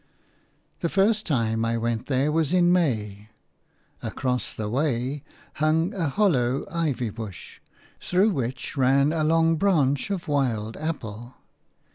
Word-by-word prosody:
The 170 - -1
first 210 +4 +2
time 115 -6 0
I 115 0 0
went 115 -1 -2
there 135 +2 +1
was 160 +1 +1
in 175 -1 +4
May. 110 - -1 0.7
Across 125 -1 -2
the 110 - -3
way 135 +2 -1 0.3
hung 160 +4 +1
a 170 -7 -1
hollow 135 - +1
ivy 145 -9 -1
bush, 110 -3 -9 0.4
through 190 +4 +2
which 130 -5 -3
ran 140 +2 +3
a 160 -2 0
long 165 +1 +3
branch 150 -6 +2
of 195 -4 -3
wild 120 -7 0
apple. 120 -7 -5
140 Hz, 130 wpm, -25 LUFS, 120-165 Hz, 0.7 s, in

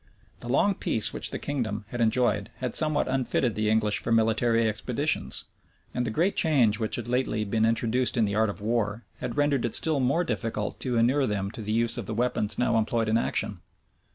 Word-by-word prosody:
The 120 - -8
long 195 +10 +3
peace 110 - 0
which - - 0
the - - -4
kingdom 110 -7 -3
had 120 0 -4
enjoyed 110 -3 +1
had 125 -2 -4
somewhat 155 -1 +2
unfitted 130 -2 0
the 105 +1 -1
English 110 -1 +2
for 115 - -4
military 115 +1 +2
expeditions; 125 +7 0 0.5
and 125 0 -1
the - - -1
great 170 - 0
change 125 -9 +3
which 110 -1 +1
had 120 - -5
lately 120 -3 -1
been 110 +2 +1
introduced 120 +3 0
in 115 - +3
the 100 - -2
art 110 +1 +2
of 100 - -7
war, 110 0 -1 0.2
had 125 -2 -5
rendered 145 -3 +1
it 120 - +2
still 155 -3 +2
more 135 +7 +1
difficult 110 -5 -3
to 125 -3 -2
inure 130 +4 +2
them 100 -2 -2
to 115 - -8
the 105 0 -4
use 115 +1 0
of 105 - -6
the 110 - -4
weapons 115 -3 0
now 120 -2 +2
employed 110 0 0
in 110 - +3
action. 100 -4 -2
115 Hz, 210 wpm, -26 LUFS, 110-125 Hz, 0.5 s, long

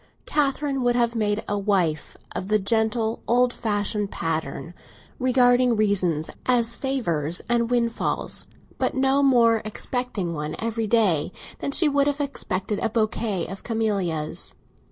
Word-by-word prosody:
Catherine 280 -1 0
would 245 -1 +2
have 235 -1 +2
made 210 -2 0
a 205 0 -1
wife 180 -7 0
of 185 - -4
the 215 +1 +3
gentle 220 +2 0
old 245 +1 +3
fashioned 205 -1 -1
pattern—regarding 245 +10 0
reasons 185 -7 +1 0.2
as 235 -2 +2
favours 175 - -1
and 235 -1 +1
windfalls, 235 -2 -1 0.3
but - - 0
no 270 +1 +3
more 235 -5 +4
expecting 215 -4 -3
one 150 0 -4
every 225 -1 -2
day 195 -9 +2 0.3
than - - -2
she 305 +3 +4
would 285 -1 +2
have 290 0 0
expected 210 -8 -2
a - - 0
bouquet 215 -4 -1
of 195 +1 -8
camellias. 195 -9 -2
225 Hz, 135 wpm, -24 LUFS, 195-245 Hz, 0.3 s, more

